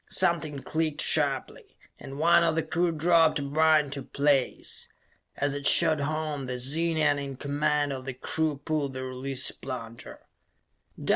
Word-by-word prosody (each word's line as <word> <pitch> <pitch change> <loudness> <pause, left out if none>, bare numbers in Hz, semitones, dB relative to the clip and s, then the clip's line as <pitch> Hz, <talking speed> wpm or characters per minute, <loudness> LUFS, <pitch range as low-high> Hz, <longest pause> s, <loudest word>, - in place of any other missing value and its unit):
Something 155 -5 0
clicked 155 -1 -2
sharply, 140 -4 -1 0.2
and 135 +1 -9
one 170 +2 +4
of 165 -1 +1
the 165 - 0
crew 170 +2 0
dropped 165 0 +3
a 145 - -3
bar 155 +2 +3
into 140 -1 -5
place. 140 -1 -1 0.5
As 145 0 0
it 145 0 0
shot 160 -3 +5
home, 150 -2 -3
the 125 0 -4
Zenian 150 +2 +1
in 140 -1 -6
command 145 +1 -1
of 130 -1 -7
the 135 -2 -5
crew 155 +3 -1
pulled 150 -4 -2
the 130 0 -5
release 130 +1 -1
plunger. 115 -3 -9
145 Hz, 150 wpm, -27 LUFS, 135-160 Hz, 0.5 s, shot